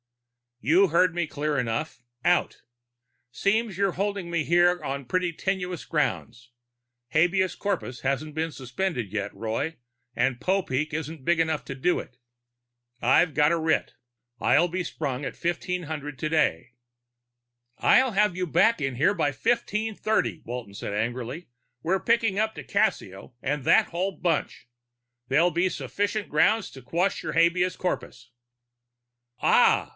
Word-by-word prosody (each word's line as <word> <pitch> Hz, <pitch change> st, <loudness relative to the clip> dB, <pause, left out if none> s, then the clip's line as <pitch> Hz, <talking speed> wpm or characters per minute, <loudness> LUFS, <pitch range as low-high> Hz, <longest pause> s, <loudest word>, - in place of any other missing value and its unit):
"You 180 Hz, +8 st, +5 dB
heard 170 Hz, +1 st, +3 dB
me 175 Hz, -1 st, 0 dB
clear 150 Hz, 0 st, -2 dB
enough. 120 Hz, +3 st, -3 dB, 0.2 s
Out. 175 Hz, 0 st, +1 dB, 0.7 s
Seems 200 Hz, -, 0 dB
you're 195 Hz, -2 st, +1 dB
holding 200 Hz, -2 st, -2 dB
me 170 Hz, -2 st, 0 dB
here 175 Hz, +1 st, +3 dB
on 140 Hz, -1 st, -4 dB
pretty 180 Hz, +5 st, 0 dB
tenuous 180 Hz, -1 st, -3 dB
grounds. 125 Hz, -5 st, -2 dB, 0.6 s
Habeas 180 Hz, +6 st, +2 dB
corpus 180 Hz, -, -3 dB
hasn't 140 Hz, +3 st, -2 dB
been 160 Hz, +1 st, -1 dB
suspended 130 Hz, -, -3 dB
yet, 100 Hz, -1 st, -3 dB
Roy, 115 Hz, +9 st, -3 dB, 0.4 s
and 125 Hz, -1 st, +1 dB
Popeek 155 Hz, -6 st, 0 dB
isn't 155 Hz, -2 st, -5 dB
big 170 Hz, -1 st, +2 dB
enough 160 Hz, -2 st, 0 dB
to 135 Hz, -, -6 dB
do 175 Hz, +7 st, +1 dB
it. 125 Hz, -, -10 dB, 0.8 s
I've 145 Hz, +6 st, +4 dB
got 150 Hz, +1 st, +4 dB
a 170 Hz, -, +2 dB
writ. 160 Hz, 0 st, 0 dB, 0.4 s
I'll 165 Hz, +8 st, +4 dB
be 180 Hz, +1 st, -3 dB
sprung 140 Hz, -5 st, -4 dB
at 135 Hz, -, -4 dB
1500 160 Hz, -4 st, -3 dB
today." 150 Hz, -, 0 dB, 1.0 s
"I'll 260 Hz, -1 st, +4 dB
have 210 Hz, -2 st, +2 dB
you 185 Hz, 0 st, -1 dB
back 180 Hz, +4 st, +3 dB
in 135 Hz, -2 st, -1 dB, 0.2 s
by 145 Hz, -3 st, +1 dB
1530," 215 Hz, -, 0 dB
Walton 120 Hz, -4 st, -6 dB
said 100 Hz, -, -5 dB
angrily. 120 Hz, +8 st, -3 dB, 0.3 s
"We're 190 Hz, +6 st, +1 dB
picking 225 Hz, -3 st, +1 dB
up 220 Hz, +1 st, +1 dB
di -, -, -7 dB
Cassio 95 Hz, +5 st, -1 dB
and 145 Hz, 0 st, -2 dB
that -, -, +5 dB
whole 180 Hz, +3 st, -2 dB
bunch. 165 Hz, -8 st, -1 dB, 0.6 s
That'll 160 Hz, +7 st, +3 dB
be 175 Hz, +3 st, +1 dB
sufficient 205 Hz, +3 st, -2 dB
grounds 205 Hz, +8 st, +3 dB
to 130 Hz, -, -12 dB
quash 175 Hz, +8 st, 0 dB
your 155 Hz, -2 st, -3 dB
habeas 170 Hz, +2 st, +3 dB
corpus." 125 Hz, -8 st, -4 dB, 1.1 s
"Ah! -, -, +4 dB
165 Hz, 140 wpm, -26 LUFS, 135-185 Hz, 1.1 s, You